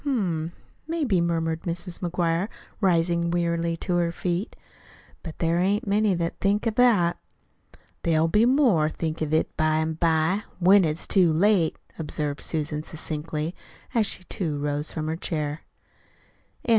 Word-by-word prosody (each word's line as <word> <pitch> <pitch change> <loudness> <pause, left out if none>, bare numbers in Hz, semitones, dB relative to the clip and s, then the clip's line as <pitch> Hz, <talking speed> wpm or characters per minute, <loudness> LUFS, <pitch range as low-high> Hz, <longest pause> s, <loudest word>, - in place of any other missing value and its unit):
"Hm 285 -2 0 0.3
m, - - -10 0.4
maybe," 290 - +1
murmured 165 -1 0
Mrs. 175 +1 -4
McGuire, 175 +1 0 0.3
rising 170 -3 +2
wearily 170 -1 0
to 175 +1 -1
her 170 -1 +1
feet; 175 +3 -3 0.7
"but 160 -3 -8
there 165 +1 +1
ain't 200 +3 +1
many 205 -1 +2
that 170 -1 -3
thinks 205 +3 +1
of 225 - 0
that." 215 -8 +3 0.8
"There'll 160 -1 +2
be 210 +8 +4
more 240 - +4
think 160 0 -4
of 155 -1 -1
it 155 - +1
by 155 -1 +2
an' 160 0 0
by 165 +4 +1 0.2
when 190 +1 +6
it's 155 +1 -2
too 180 -5 +4
late," 175 0 +3 0.2
observed 150 -2 -3
Susan 150 -1 -2
succinctly, 155 +1 -4 0.4
as 225 -4 +3
she, 185 - -3
too, 165 -5 -3
rose 145 +1 -1
from 155 -2 -4
her 160 +1 -1
chair. 150 -3 -3
170 Hz, 150 wpm, -25 LUFS, 160-190 Hz, 0.8 s, when